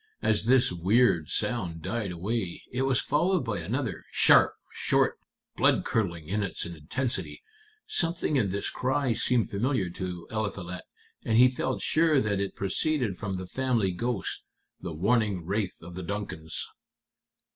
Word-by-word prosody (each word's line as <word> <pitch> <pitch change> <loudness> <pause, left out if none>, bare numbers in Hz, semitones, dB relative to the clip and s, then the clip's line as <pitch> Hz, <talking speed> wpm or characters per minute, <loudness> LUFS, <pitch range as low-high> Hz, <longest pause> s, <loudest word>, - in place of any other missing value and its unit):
As 105 0 +2
this 125 -2 +4
weird 90 - +3
sound 85 -9 -2
died 110 -2 -2
away, 95 +1 -3
it 125 - -1
was 130 -2 +3
followed 175 0 +1
by 110 -5 -2
another, 80 - -3
sharp, - - +6 0.2
short, - - +1 0.4
blood - - +3
curdling 85 -8 -1
in 105 +4 0
its 100 - -3
intensity. 85 - -3 0.4
Something 165 -3 0
in 110 -8 +2
this 100 +2 -2
cry 130 -1 0
seemed 120 0 +1
familiar 105 -3 0
to 90 -1 -5
Eliphalet, 100 -5 -4 0.4
and 110 - +2
he 125 +2 +8
felt 130 0 -2
sure 155 -2 +3
that 105 -4 0
it 100 0 -2
proceeded 115 - 0
from 100 -3 -3
the 95 - -5
family 115 -1 0
ghost, 115 +2 -2 0.4
the 85 - -5
warning 100 +1 +1
wraith 100 +1 -1
of 90 +1 -9
the 95 - -5
Duncans." 90 -4 -4
105 Hz, 145 wpm, -28 LUFS, 90-125 Hz, 0.4 s, he